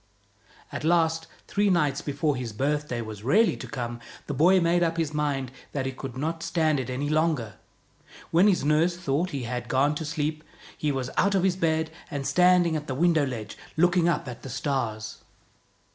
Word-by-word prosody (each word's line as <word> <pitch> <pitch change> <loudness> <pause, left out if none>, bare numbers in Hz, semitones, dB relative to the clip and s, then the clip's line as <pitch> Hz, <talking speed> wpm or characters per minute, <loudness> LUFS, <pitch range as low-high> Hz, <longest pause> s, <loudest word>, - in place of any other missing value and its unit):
At - - -5
last, 165 -1 +2 0.2
three 205 0 +1
nights 150 -7 +2
before 145 +1 -1
his 125 -4 -5
birthday 140 0 -1
was 110 -2 -7
really 205 - +3
to - - -7
come, 120 -3 -4 0.3
the 145 - -4
boy 175 +7 +5
made 170 0 +2
up 165 -1 +1
his 160 -3 -1
mind 140 -4 -1 0.2
that 135 -2 -2
he 135 - -1
could 130 -1 -7
not 160 +4 -2
stand 160 -4 +1
it 130 -1 -4
any 130 +3 -2
longer. 155 - 0 0.7
When 175 +5 +5
his 180 -8 +2
nurse 160 +4 +2
thought 170 +1 0
he 140 -6 -4
had 120 +1 -4
gone 135 +3 +3
to 160 +2 -4
sleep, 155 0 -2 0.3
he 150 - -1
was 130 -2 -3
out 200 +1 +3
of 190 - +2
his 190 -2 +2
bed 160 -2 0 0.2
and 140 -4 -4
standing 180 -1 +4
at 150 -1 -4
the 130 - -3
window 160 -1 +3
ledge, 110 -5 -6 0.2
looking 175 0 +4
up 170 - -1
at 125 -2 -7
the 135 - -8
stars. 115 -5 -2
150 Hz, 190 wpm, -26 LUFS, 130-170 Hz, 0.7 s, boy